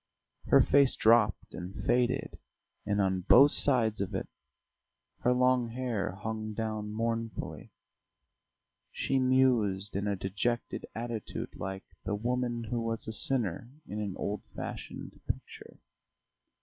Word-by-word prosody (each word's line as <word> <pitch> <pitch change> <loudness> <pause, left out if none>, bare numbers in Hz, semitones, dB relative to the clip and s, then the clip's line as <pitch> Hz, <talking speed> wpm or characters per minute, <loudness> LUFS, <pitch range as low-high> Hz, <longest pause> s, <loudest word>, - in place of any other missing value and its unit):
Her - - +7
face 140 -2 +5
dropped 110 -3 +3
and 90 +2 -7
faded, 125 +2 +1 0.5
and 105 -1 +1
on 95 -1 +2
both 135 +10 +7
sides 115 -6 +2
of 100 - -3
it - - -2 0.9
her 125 - +2
long 125 -1 +3
hair 115 -6 -2
hung 110 +2 -4
down 110 -1 -3
mournfully; 115 +1 -3 1.2
she 135 - 0
mused 120 -7 +2
in 100 +1 -1
a 100 - +1
dejected 100 +6 -2
attitude 115 -1 -5
like 95 0 -5 0.2
"the 105 - -1
woman 120 +1 -1
who 115 +1 -2
was 115 -1 -3
a 110 - -3
sinner" 115 -4 0 0.2
in 105 - -5
an 100 -3 -3
old 105 0 -2
fashioned - - -7
picture. - - -6
115 Hz, 125 wpm, -30 LUFS, 105-125 Hz, 1.2 s, Her